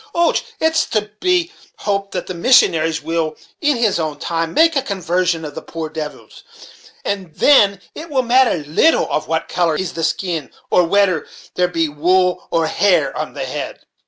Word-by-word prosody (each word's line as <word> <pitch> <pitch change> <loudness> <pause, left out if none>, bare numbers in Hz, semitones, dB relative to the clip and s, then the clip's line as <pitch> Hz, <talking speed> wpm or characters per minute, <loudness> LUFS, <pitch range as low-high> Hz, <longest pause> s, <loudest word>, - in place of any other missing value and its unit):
Och! 340 -1 +3 0.2
it's 320 0 +2
to 210 -1 -2
be 365 -1 +1 0.3
hoped 200 -1 -2
that 180 - -3
the 185 - -5
missionaries 165 - +3
will, 160 -1 -2 0.2
in 295 -4 +2
his 220 -6 +1
own 155 -2 -3
time, 165 +1 -2
make 325 - +4
a 275 - +2
conversion 180 - -1
of 150 - -7
the - - -7
poor 165 -1 -6
devils; 150 -3 -8 0.6
and 190 -5 -4
then 200 -9 +5
it 325 +2 -9
will 265 -3 +1
matter 245 - +3
little 240 - +3
of 155 - -1
what 160 0 -1
color 170 -3 0
is 180 +1 -3
the 165 - -4
skin, 165 -3 -2 0.2
or 180 - +4
wedder 185 -2 +2 0.3
there 180 0 +1
be 165 -2 0
wool 180 +5 +1
or 165 -1 +1
hair 195 +4 +2
on - - -5
the - - -3
head." - - -6
180 Hz, 180 wpm, -18 LUFS, 165-220 Hz, 0.6 s, then